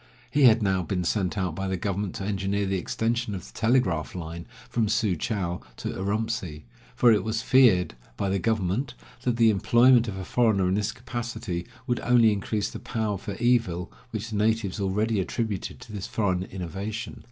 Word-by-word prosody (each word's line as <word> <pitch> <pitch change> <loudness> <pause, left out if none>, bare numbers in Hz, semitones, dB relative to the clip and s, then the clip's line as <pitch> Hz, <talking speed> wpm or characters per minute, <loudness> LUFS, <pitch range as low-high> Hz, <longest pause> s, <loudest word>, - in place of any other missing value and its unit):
He 145 -2 +4
had 115 -2 +6
now 95 -2 +2
been 90 +1 -2
sent 95 +2 0
out 95 -4 -1
by 95 +4 -3
the 95 0 -1
government 100 +1 -2
to - - -4
engineer 100 0 -1
the 95 -1 0
extension 115 +2 -1
of 90 - -7
the - - -14
telegraph 110 -11 +1
line 85 -1 -6 0.2
from 110 -3 0
Su 110 -3 +1
chou 90 -1 -2 0.2
to - - -4
Urumtsi, 100 -5 -2 0.3
for 120 - +5
it 105 -4 +3
was 110 +2 -2
feared 120 - +5 0.2
by 100 - -1
the 95 0 +1
government 110 +6 -1 0.3
that 120 -2 0
the 115 -2 +6
employment 120 +4 +5
of 100 -3 -4
a 95 - -5
foreigner 110 -6 +2
in 90 - +1
this 105 +1 0
capacity 120 -7 -5 0.2
would 120 - 0
only 120 -2 +5
increase 105 +1 -2
the - - -7
power 110 -3 -2
for 100 0 -6
evil 95 -8 +1 0.2
which 110 0 -5
the 105 - -2
natives 110 -1 +1
already 105 +2 0
attributed 105 +1 -3
to - - -11
this 100 -2 -5
foreign 95 -4 0
innovation. 100 +6 -5
105 Hz, 185 wpm, -26 LUFS, 95-115 Hz, 0.3 s, had